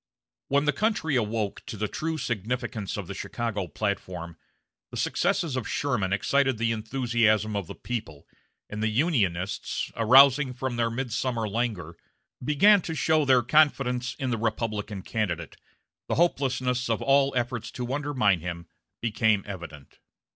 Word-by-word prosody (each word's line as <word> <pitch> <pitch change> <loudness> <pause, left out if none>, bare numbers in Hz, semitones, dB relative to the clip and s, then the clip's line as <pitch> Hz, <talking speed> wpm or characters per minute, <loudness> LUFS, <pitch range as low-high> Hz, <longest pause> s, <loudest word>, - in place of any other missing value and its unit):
When 140 +1 +2
the 150 - +2
country 205 -9 0
awoke 110 -3 -1
to 110 - -6
the 105 +1 -1
true 160 +8 -3
significance 120 -4 -3
of 100 - -4
the 100 - -6
Chicago 100 0 -3
platform, 90 -5 -4 0.5
the - - -7
successes 155 -6 0
of 130 -4 -3
Sherman 115 -10 -1
excited 135 +5 +2
the 115 +1 +1
enthusiasm 110 -2 +1
of 100 -4 -2
the - - -8
people, 80 -12 -6 0.4
and 105 +1 -6
the 110 - +2
Unionists, 105 - 0
arousing 130 +3 +6
from 130 -1 -3
their 115 -1 +1
midsummer 120 -1 -2
languor, 100 -7 -3 0.5
began 185 +9 +5
to 165 -1 -5
show 155 -1 +2
their 130 -2 +4
confidence 125 -3 +2
in 130 -2 -2
the 115 - -1
Republican 105 -3 -2
candidate, 85 -9 -3 0.5
the - - 0
hopelessness 130 -6 +1
of 115 - 0
all 140 0 +4
efforts 120 -2 -2
to 125 +1 -4
undermine 130 -10 +1
him 85 0 -6 0.4
became 110 -3 +2
evident. 85 -8 -9
115 Hz, 145 wpm, -27 LUFS, 105-135 Hz, 0.5 s, arousing